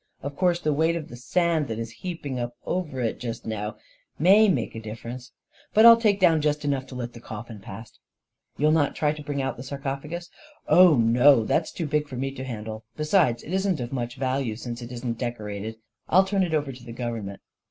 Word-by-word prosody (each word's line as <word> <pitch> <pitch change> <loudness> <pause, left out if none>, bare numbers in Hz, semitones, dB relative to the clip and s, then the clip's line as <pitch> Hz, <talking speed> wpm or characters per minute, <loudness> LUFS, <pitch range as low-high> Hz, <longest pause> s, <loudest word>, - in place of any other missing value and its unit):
Of 140 +1 -5
course 175 +1 +2
the 155 -3 0
weight 160 +3 +2
of 160 -3 -5
the 120 - -9
sand 160 +4 +1
that 110 -2 -4
is 115 0 -5
heaped 175 -4 -5
up 120 -3 -3
over 155 -8 -2
it 115 0 -2 0.2
now 105 -1 -4 0.4
may 200 +7 +6
make 190 - 0
a 115 - -6
dif 110 0 -7
ference, 125 +2 -7 0.5
but 220 +2 +7
I'll 230 0 +11
take 215 -3 +2
down 165 -4 +4
just 150 0 0
enough 140 -2 -1
to 130 - -10
let 120 -1 -5
the 120 - -10
coffin 110 -1 -8
past/' 110 +2 -11 0.3
" - - -47
You'll 150 +2 +3
not 155 -3 +2
try 150 -1 +1
to 155 - -9
bring 145 -1 -3
out 130 - -3
the 125 - -7
sarcophagus? 140 +5 -5
" 300 0 -23
" - - -36
Oh, 180 -3 +7
no; 120 +2 +5
that's - - +1
too 165 - -4
big 150 0 0
for 135 - -8
me 135 +2 -2
to 130 -1 -7
handle 110 -3 -6
— 125 - -39
be 155 - -2
sides, 150 -7 +2
it 170 - -7
isn't 190 -4 +1
of 120 +1 -5
much 120 -2 -3
value, 130 -3 -1
since 120 +1 -6
it 120 0 -8
isn't 120 -1 -4
decorated. 110 -3 -4 0.3
I'll 190 +3 +5
turn 195 0 0
it 170 -4 +1
over 145 -2 -1
to 125 -1 -12
the 120 -1 -9
government." 115 -5 -5
135 Hz, 235 wpm, -25 LUFS, 120-160 Hz, 0.5 s, I'll